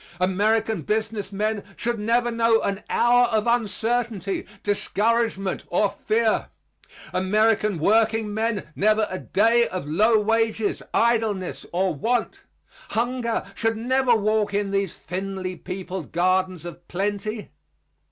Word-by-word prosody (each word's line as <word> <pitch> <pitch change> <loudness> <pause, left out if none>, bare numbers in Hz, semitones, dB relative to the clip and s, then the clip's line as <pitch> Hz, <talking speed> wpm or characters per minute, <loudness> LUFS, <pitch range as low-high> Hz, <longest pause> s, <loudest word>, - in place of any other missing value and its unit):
American 210 +2 +1
business 210 +2 -2
men 210 +1 -1
should 235 -1 -2
never 240 +3 +1
know 230 -1 +3
an 200 +1 -2
hour 245 +1 +4
of 220 -2 0
uncertainty, 230 -3 -1 0.2
discouragement 205 -1 0
or 195 +3 +1
fear; 220 0 0 0.7
American 210 +1 +2
workingmen 220 +3 +1
never 215 +1 +3
a 185 - -3
day 230 +3 +3
of 185 -6 -5
low 215 +8 +4
wages, 225 0 0
idleness 220 -5 0
or 185 +1 +1
want. 235 - -1 0.5
Hunger 235 0 -1
should 225 +1 -1
never 250 +1 +2
walk 215 -1 +1
in 205 -1 0
these 195 -3 -1
thinly 185 +1 -4
peopled 185 -1 -6
gardens 185 0 +1
of 175 0 -9
plenty. 205 +3 -3
215 Hz, 115 wpm, -24 LUFS, 195-225 Hz, 0.7 s, hour